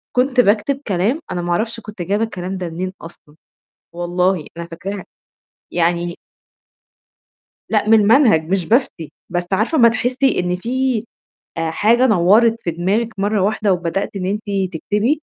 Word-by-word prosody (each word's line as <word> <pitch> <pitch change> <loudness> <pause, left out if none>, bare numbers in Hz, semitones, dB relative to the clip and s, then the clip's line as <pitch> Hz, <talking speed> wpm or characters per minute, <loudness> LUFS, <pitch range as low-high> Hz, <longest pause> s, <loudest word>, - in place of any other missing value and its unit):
كنت 255 0 +2
باكتب 245 +6 +2
كلام 200 - 0
أنا 175 - -2
ما 175 0 -3
أعرفش 225 +5 -1
كنت 210 -5 -9
جايبة 205 +5 0
الكلام 185 -3 -4
ده 180 -2 -4
منين 185 +3 -4
أصلًا، 155 -2 -13 0.6
والله 175 -1 0
أنا 170 0 -6
فاكراها، 190 +4 -6 0.7
يعني 175 0 0 1.6
لأ، 215 -1 +1
من 225 -1 +6
المنهج 210 - +4
مش 190 -2 0
بافتي، 220 - 0 0.2
بس 175 0 -2
عارفة 225 +11 +1
أمّا 235 -1 +7
تحسّي 250 +3 +1
إن 180 0 -1
في 245 +2 -1 0.5
آآ 165 -1 -1
حاجة 235 +9 +3
نوّرت 220 +3 +4
في 170 - -2
دماغِك 195 +8 0
مَرّة 205 0 +1
واحدة 210 0 +1
وبدأتِ 180 +3 -2
إن 185 -1 -3
أنتِ 210 +2 -2 0.3
تكتبي، 210 - -1
200 Hz, 150 wpm, -19 LUFS, 175-230 Hz, 1.6 s, أمّا